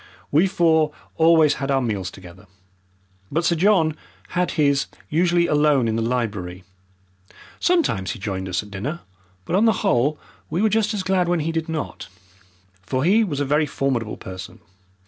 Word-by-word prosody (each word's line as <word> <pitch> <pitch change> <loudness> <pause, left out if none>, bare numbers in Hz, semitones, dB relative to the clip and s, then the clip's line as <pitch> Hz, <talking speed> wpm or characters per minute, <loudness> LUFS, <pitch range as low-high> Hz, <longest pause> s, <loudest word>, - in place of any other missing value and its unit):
We 160 +7 +4
four 160 -4 +2 0.2
always 160 -2 +5
had 135 - -2
our 135 -1 +3
meals 105 -8 -2
together, 95 +2 -14 0.8
but 165 +4 0
Sir 170 - +3
John 165 -3 +3 0.3
had 180 0 0
his 140 -2 +2 0.2
usually 170 +2 +2
alone 150 -5 +3
in 110 - 0
the 115 - 0
library. 105 -7 -3 1.0
Sometimes 330 - +1
he - - -9
joined 95 -2 -4
us 90 +2 -1
at 105 - -14
dinner, 135 - -4 0.4
but 175 - -1
on 205 +4 +4
the 225 -1 +1
whole 145 -2 +2 0.3
we 170 - -2
were 220 - +4
just 215 +1 +1
as 195 - -2
glad 185 -2 +1
when 175 -2 +1
he 160 +2 -1
did 165 0 -3
not. 160 -2 -5 0.7
For 130 +7 -2
he 205 +7 +4
was 150 -9 -3
a 145 - 0
very 150 +2 +2
formidable 130 -6 -2
person. 95 0 -9
150 Hz, 170 wpm, -22 LUFS, 115-175 Hz, 1.0 s, always